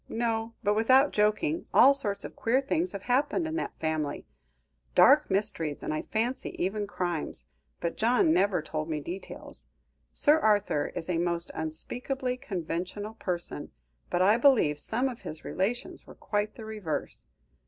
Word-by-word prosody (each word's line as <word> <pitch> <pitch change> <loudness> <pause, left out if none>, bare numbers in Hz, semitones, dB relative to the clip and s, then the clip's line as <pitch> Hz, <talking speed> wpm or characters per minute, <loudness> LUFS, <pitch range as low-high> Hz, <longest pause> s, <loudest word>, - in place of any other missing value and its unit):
No; 225 0 -2
but 205 - +3
without 260 +6 +4
joking, 215 +11 +1
all 275 +3 +8
sorts 205 -8 -1
of - - -9
queer 240 +4 +2
things 320 +6 -1
have 200 - -6
happened 275 +7 +1
in 320 0 -3
that - - -4
family 155 -2 -2 0.7
dark - - +6
mysteries, 190 -7 -1
and - - -2
I 155 - -1
fancy 235 +4 -2
even 205 +3 -1
crimes; 175 -5 -3 0.3
but 170 -1 -3
John 250 - +3
never 200 - +2
told 155 0 -4
me 155 -1 -1
details. 175 +6 -8 0.4
Sir 305 +1 +4
Arthur 205 - +2
is 165 - -5
a 175 -2 0
most 170 0 +2
unspeakably 250 - -3
conventional 195 - -4
person, 175 -8 -2 0.4
but 175 - +2
I 205 +4 +5
believe 235 - +4
some 240 - 0
of 250 -3 -6
his 155 0 -6
relations 220 +6 -2
were - - -12
quite 210 0 -2
the 225 - -9
reverse. 210 -8 -5
210 Hz, 155 wpm, -28 LUFS, 170-245 Hz, 0.7 s, all